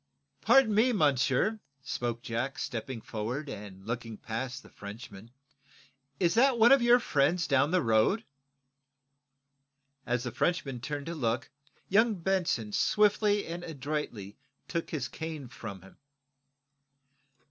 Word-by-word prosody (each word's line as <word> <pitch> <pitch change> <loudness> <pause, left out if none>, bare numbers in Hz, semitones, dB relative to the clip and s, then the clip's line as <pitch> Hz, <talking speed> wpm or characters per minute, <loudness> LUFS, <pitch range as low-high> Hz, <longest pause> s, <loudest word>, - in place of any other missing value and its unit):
"Pardon 270 -5 +5
me, 235 +4 +4
monsieur," 150 - +2 0.2
spoke 120 -3 -3
Jack, 125 +2 -3
stepping 120 0 -4
forward, 120 +8 -4
and 100 -2 -9
looking 115 -1 -4
past 125 +4 -5
the - - -15
Frenchman; 105 0 -10 0.9
"is 170 -2 +3
that 255 +3 +4
one 230 +1 +6
of 275 -1 +7
your 240 +1 +6
friends 165 - +1
down 140 0 +3
the 180 -1 +2
road?" 115 - +3 1.8
As 120 0 0
the 120 - -4
Frenchman 135 0 -1
turned 145 +1 -4
to 170 - -4
look, 120 -7 -2 0.4
young 220 +3 +3
Benson 175 - 0
swiftly 210 - +2
and 170 +1 -6
adroitly 140 - -5 0.3
took 170 -1 -3
his 140 -6 -3
cane 155 -3 -6
from 105 -6 -9
him. 95 - -16
140 Hz, 125 wpm, -30 LUFS, 115-185 Hz, 1.8 s, of